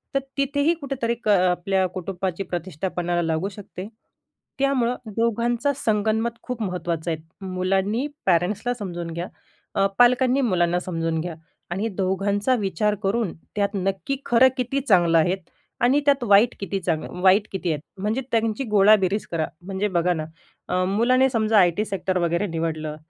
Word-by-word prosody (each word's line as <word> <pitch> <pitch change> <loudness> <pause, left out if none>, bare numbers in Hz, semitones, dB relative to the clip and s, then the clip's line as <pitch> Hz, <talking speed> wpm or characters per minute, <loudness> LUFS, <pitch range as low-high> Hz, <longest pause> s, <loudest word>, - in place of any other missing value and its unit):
तर - - +4 0.2
तिथेही 285 +4 +2
कुठेतरी 255 -4 -2
क - - -5
आपल्या 185 0 +2
कुटुंबाची 185 0 -3
प्रतिष्ठा 175 -1 -4
पणाला 175 0 0
लागू 165 +4 -1
शकते. 195 -1 -9 0.7
त्यामुळं 255 -3 +2 0.2
दोघांचा 235 +4 +1
संगनमत 220 -1 0
खूप 250 -3 -5
महत्त्वाचं 170 -3 -2
आहे. 160 - -3 0.3
मुलांनी 190 +7 0 0.2
पॅरेंट्सला 195 +7 +1
समजून 175 -7 -5
घ्या, 170 +2 -4 0.5
अ, 195 - +3
पालकांनी 250 +2 +4
मुलांना 175 -7 +2
समजून 165 -2 -2
घ्या 170 -2 -5 0.4
आणि 200 +5 -1
दोघांचा 200 +5 +1
विचार 210 -1 0
करून 200 -1 0 0.2
त्यात 200 -1 +1
नक्की 195 +7 -1
खरं 250 +2 +5
किती 255 +2 -1
चांगलं 175 -9 +4
आहे 175 +4 +3 0.5
आणि 265 +4 +4
त्यात 280 -3 +3
वाईट 210 +2 +5
किती? 195 0 -3
चांगलं 170 +1 -3
वाईट 195 +3 +5
किती 190 -2 -3
आहेत? 150 - -3 0.2
म्हणजे 215 +6 0
त्यांची 225 +2 0
गोळाबेरीज 205 -1 +4
करा. 165 -2 0 0.2
म्हणजे 195 +3 -2
बघा 175 +1 +2
ना, 155 -2 -4 0.4
अ, 185 0 +1
मुलाने 255 +6 +3
समजा 220 -3 +2
आय-टी 180 +4 +3
सेक्टर 190 -2 -2
वगैरे 170 +4 0
निवडलं, 160 -2 -3
195 Hz, 150 wpm, -23 LUFS, 175-235 Hz, 0.7 s, खरं